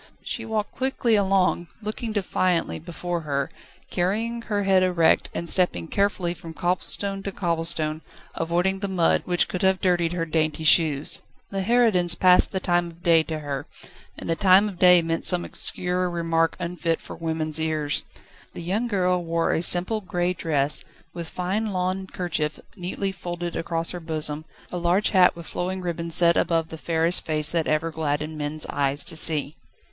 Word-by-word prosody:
She 225 Hz, -, -4 dB
walked 220 Hz, -2 st, -3 dB
quickly 260 Hz, -3 st, 0 dB
along, 190 Hz, -3 st, +1 dB
looking 220 Hz, +1 st, -5 dB
defiantly 185 Hz, -4 st, -1 dB
before 175 Hz, +1 st, -5 dB
her, 140 Hz, -3 st, -3 dB, 0.4 s
carrying 220 Hz, +6 st, -2 dB
her 205 Hz, -3 st, -3 dB
head 190 Hz, -1 st, +3 dB
erect, 175 Hz, -3 st, +2 dB
and 170 Hz, -, -5 dB
stepping 165 Hz, -, +1 dB
carefully 200 Hz, -3 st, -1 dB
from 165 Hz, -2 st, -11 dB
cobblestone 195 Hz, +3 st, -1 dB
to 200 Hz, -, -5 dB
cobblestone, 165 Hz, -4 st, -1 dB, 0.3 s
avoiding 175 Hz, +4 st, -1 dB
the 200 Hz, -, -3 dB
mud, 180 Hz, -4 st, +1 dB
which 175 Hz, -1 st, +1 dB
could 180 Hz, -, -5 dB
have 190 Hz, 0 st, +2 dB
dirtied 175 Hz, -3 st, 0 dB
her 170 Hz, -2 st, -2 dB
dainty 155 Hz, -1 st, -2 dB
shoes. 155 Hz, -3 st, +4 dB, 0.3 s
The 195 Hz, -1 st, -3 dB
harridans 195 Hz, -6 st, +3 dB
passed 180 Hz, 0 st, +4 dB
the 190 Hz, -, -2 dB
time 175 Hz, -1 st, 0 dB
of 170 Hz, +1 st, -15 dB
day 165 Hz, -3 st, +4 dB
to 160 Hz, 0 st, -5 dB
her, 140 Hz, -2 st, -5 dB, 0.5 s
and -, -, -8 dB
the 165 Hz, -, 0 dB
time 190 Hz, +3 st, +4 dB
of 190 Hz, -4 st, -9 dB
day 180 Hz, -2 st, +6 dB
meant 165 Hz, 0 st, -3 dB
some 180 Hz, -1 st, +3 dB
obscene 180 Hz, -, +1 dB
remark 170 Hz, -2 st, -1 dB
unfit 170 Hz, -1 st, -3 dB
for -, -, -11 dB
women's 160 Hz, -1 st, -2 dB
ears. 155 Hz, -2 st, -1 dB, 0.5 s
The -, -, -7 dB
young 205 Hz, +8 st, -2 dB
girl 180 Hz, -4 st, 0 dB
wore 165 Hz, 0 st, -1 dB
a -, -, 0 dB
simple 180 Hz, +5 st, +9 dB
grey 180 Hz, -1 st, -2 dB
dress, 150 Hz, -4 st, +2 dB, 0.3 s
with 170 Hz, -2 st, -7 dB
fine 190 Hz, +5 st, -3 dB
lawn 190 Hz, -1 st, -3 dB
kerchief 155 Hz, -5 st, -4 dB, 0.2 s
neatly 195 Hz, +1 st, -4 dB
folded 175 Hz, -2 st, -6 dB
across 165 Hz, 0 st, -2 dB
her 180 Hz, -, -6 dB
bosom, 155 Hz, -2 st, -3 dB, 0.3 s
a 180 Hz, -, -4 dB
large 175 Hz, +4 st, +1 dB
hat 185 Hz, -3 st, +4 dB
with 170 Hz, -1 st, -10 dB
flowing 185 Hz, +3 st, -4 dB
ribbons 170 Hz, -2 st, -4 dB
sat 170 Hz, -1 st, +5 dB
above 165 Hz, -1 st, 0 dB
the 160 Hz, -, -9 dB
fairest 165 Hz, +2 st, +1 dB
face 155 Hz, -1 st, +1 dB
that 165 Hz, -2 st, -1 dB
ever 155 Hz, +2 st, -1 dB
gladdened 155 Hz, 0 st, -3 dB
men's 150 Hz, +1 st, -3 dB
eyes 140 Hz, 0 st, -1 dB
to -, -, 0 dB
see. 155 Hz, -1 st, 0 dB
175 Hz, 170 wpm, -23 LUFS, 160-185 Hz, 0.5 s, simple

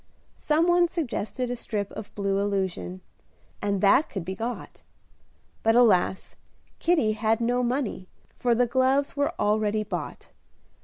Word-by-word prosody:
Some 315 Hz, +3 st, +2 dB
one 350 Hz, 0 st, +4 dB
suggested 250 Hz, -, -3 dB
a -, -, -1 dB
strip 210 Hz, -4 st, -4 dB
of 215 Hz, -, -9 dB
blue 195 Hz, -1 st, 0 dB
illusion, 190 Hz, -, -2 dB, 0.6 s
and 200 Hz, -2 st, -1 dB
that 210 Hz, +9 st, +4 dB
could 190 Hz, -5 st, -5 dB
be 190 Hz, -, -3 dB
got; 230 Hz, +4 st, -6 dB, 0.8 s
but, 225 Hz, +1 st, +3 dB
alas! 200 Hz, -6 st, +3 dB, 0.4 s
Kitty 320 Hz, -11 st, +2 dB
had 220 Hz, +1 st, +1 dB
no 245 Hz, +1 st, +1 dB
money, 245 Hz, -6 st, -2 dB, 0.3 s
for 240 Hz, -1 st, +2 dB
the 245 Hz, +1 st, +3 dB
gloves 260 Hz, +3 st, +1 dB
were 285 Hz, 0 st, 0 dB
already 215 Hz, 0 st, +1 dB
bought. -, -, -6 dB
225 Hz, 140 wpm, -26 LUFS, 200-260 Hz, 0.8 s, one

